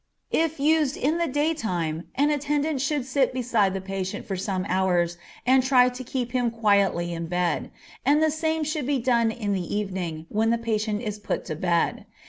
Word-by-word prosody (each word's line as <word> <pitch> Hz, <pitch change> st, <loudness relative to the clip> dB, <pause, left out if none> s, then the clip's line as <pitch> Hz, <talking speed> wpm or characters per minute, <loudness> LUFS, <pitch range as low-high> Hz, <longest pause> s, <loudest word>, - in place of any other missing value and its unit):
If 320 Hz, -2 st, +1 dB
used 300 Hz, -1 st, +2 dB
in 310 Hz, +5 st, +1 dB
the 340 Hz, -, +1 dB
daytime 220 Hz, -, -1 dB
an 290 Hz, +2 st, +3 dB
attendant 290 Hz, 0 st, 0 dB
should 280 Hz, -1 st, 0 dB
sit 265 Hz, 0 st, +1 dB
beside 230 Hz, -6 st, +1 dB
the 195 Hz, -, -3 dB
patient 190 Hz, 0 st, -4 dB
for 195 Hz, -, -3 dB
some 185 Hz, 0 st, -2 dB
hours 180 Hz, -2 st, +1 dB, 0.3 s
and 260 Hz, +1 st, +5 dB
try 250 Hz, -1 st, +5 dB
to 250 Hz, +1 st, -7 dB
keep 245 Hz, -1 st, -3 dB
him 245 Hz, -1 st, +1 dB
quietly 200 Hz, -6 st, +2 dB
in 165 Hz, 0 st, -4 dB
bed, 175 Hz, 0 st, -1 dB, 0.3 s
and 290 Hz, +2 st, +4 dB
the 315 Hz, 0 st, +3 dB
same 315 Hz, +1 st, -1 dB
should 300 Hz, -3 st, -2 dB
be 285 Hz, -1 st, +2 dB
done 235 Hz, -2 st, +2 dB
in 215 Hz, -3 st, -2 dB
the 185 Hz, 0 st, -2 dB
evening 185 Hz, -6 st, -3 dB
when 220 Hz, +2 st, +1 dB
the 235 Hz, -, +3 dB
patient 220 Hz, -1 st, -1 dB
is 210 Hz, -2 st, -4 dB
put -, -, -3 dB
to 155 Hz, -, -4 dB
bed. 170 Hz, +1 st, 0 dB
230 Hz, 190 wpm, -25 LUFS, 190-280 Hz, 0.3 s, and